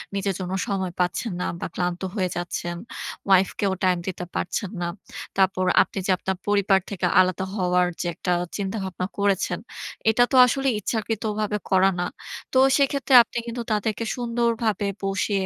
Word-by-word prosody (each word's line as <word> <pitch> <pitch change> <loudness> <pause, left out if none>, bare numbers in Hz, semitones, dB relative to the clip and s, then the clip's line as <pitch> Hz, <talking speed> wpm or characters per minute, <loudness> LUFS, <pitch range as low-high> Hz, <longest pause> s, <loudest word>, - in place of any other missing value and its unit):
নিজের 195 0 0
জন্য 185 0 -4
সময় 190 -3 -1
পাচ্ছেন 180 +5 0
না - - -1
বা - - -3
ক্লান্ত 175 0 -2
হয়ে 185 -4 0
যাচ্ছেন, 175 0 -3 0.5
ওয়াইফ 190 -1 +5
কেও 195 -2 +1
টাইম 185 -1 +3
দিতে 180 -1 -4
পারছেন 195 +1 -2
না। 175 - 0 0.5
তারপর 190 -1 +2 0.2
আপনি - - -3
যে 195 - +2
আপনার 190 0 -3
পরিবার 200 -1 +3
থেকে 190 -3 -2
আলাদা 185 0 +2
হওয়ার 180 -2 +2
যে - - -2
একটা 180 - -2 0.3
চিন্তা-ভাবনা 190 -2 -3
করেছেন, 200 -2 +1 0.5
এটা 235 +2 +4
তো 265 - +1
আসলে 270 +2 0
ইচ্ছাকৃতভাবে 215 0 -2
করা 190 0 +5
না। 175 - 0 0.5
তো - - +3 0.2
সেক্ষেত্রে 275 -1 +1
আপনি 235 - -8
কিন্তু 235 +1 -4
তাদেরকে 215 +1 0
সুন্দরভাবে 235 -4 0 0.2
বসিয়ে, 195 0 0
195 Hz, 155 wpm, -24 LUFS, 185-220 Hz, 0.5 s, ওয়াইফ